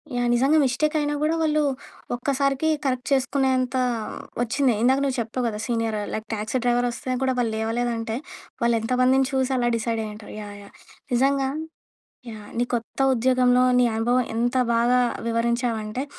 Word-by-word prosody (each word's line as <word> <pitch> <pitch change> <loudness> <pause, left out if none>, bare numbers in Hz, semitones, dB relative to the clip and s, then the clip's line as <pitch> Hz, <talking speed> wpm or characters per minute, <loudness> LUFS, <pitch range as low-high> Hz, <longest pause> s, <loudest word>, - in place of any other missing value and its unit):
Yeah! 245 0 +1
నిజంగా 270 +6 +3
mistake 300 +5 0
అయినా 295 0 -1
కూడా 320 +2 +2
వాళ్ళు 305 -1 +2 0.5
ఒక్కసారికి 275 +3 0 0.2
కరెక్ట్ 255 -2 -1
చేసుకునేంత 265 -1 +1 0.6
వచ్చింది. 255 +1 +2
ఇందాక 260 +3 +4
నువ్వు 265 -2 -1
చెప్పావు 240 +2 -3
కదా! 210 -1 -3
సీనియర్ 230 -3 -1 0.2
లైక్ 220 0 -4
టాక్సీ 215 +4 -2
డ్రైవర్ 245 0 +2
వస్తే 255 +1 -4
కూడా 260 -1 +2
వాళ్ళు 235 -2 0
లేవలేదంటే, 225 0 -2 0.5
వాళ్ళు 235 0 +3
ఎంతమందిని 255 +3 +3
చూసి 265 0 0
అలా 240 -1 +1
డిసైడ్ 230 0 -2
అయ్యి 215 -1 -6
ఉంటారు. 210 0 -11
యాహ్! 205 -1 -8
యాహ్! 200 - -16 0.4
నిజంగా 270 +2 +2 0.8
యాహ్! 210 -2 -10
నీ 240 - +2
కొత్త 235 +3 -4
ఉద్యోగంలో 250 0 +3 0.2
నీ 245 - +5
అనుభవం 245 +3 +2
ఎంత 240 +2 0 0.2
బాగా 240 +2 +3 0.3
వివరించావంటే, 230 0 -1
245 Hz, 150 wpm, -24 LUFS, 230-265 Hz, 0.8 s, నీ